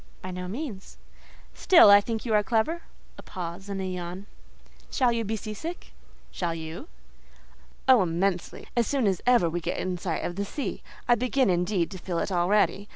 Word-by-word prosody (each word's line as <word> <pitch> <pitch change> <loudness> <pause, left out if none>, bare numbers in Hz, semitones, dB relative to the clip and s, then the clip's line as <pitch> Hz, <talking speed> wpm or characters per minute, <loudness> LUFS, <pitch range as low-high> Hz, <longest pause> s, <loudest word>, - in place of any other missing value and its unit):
"By 185 - -5
no 180 0 -5
means." 215 -2 -6 0.6
"Still 345 - +7
I 205 0 +8
think 225 +2 -4
you 225 - 0
are 210 - +5
clever" 240 +11 0 0.4
(a - - -7
pause 180 +2 -7
and 195 -1 -3
a 190 - -2
yawn). 180 +1 -5 0.6
"Shall 255 -3 +2
you 230 -1 -1
be 220 +1 -2
sea 215 0 -6
sick?" 330 +11 -7 0.4
"Shall 170 -2 -2
you?" 160 - -7 1.0
"Oh, 255 -4 +7
immensely! 180 +1 -1
as 235 -2 +2
soon 275 -4 +1
as 190 -3 +1
ever 245 -8 +5
we 170 +1 -2
get - - -3
in 180 -1 -2
sight 170 -3 -2
of 175 - -4
the 200 - 0
sea: 270 +8 -4 0.3
I 240 - +6
begin, 255 -1 +2
indeed, 180 0 0
to 190 - -7
feel 175 -1 -4
it 195 - -1
already. 200 +3 +2
200 Hz, 190 wpm, -27 LUFS, 180-230 Hz, 1.0 s, I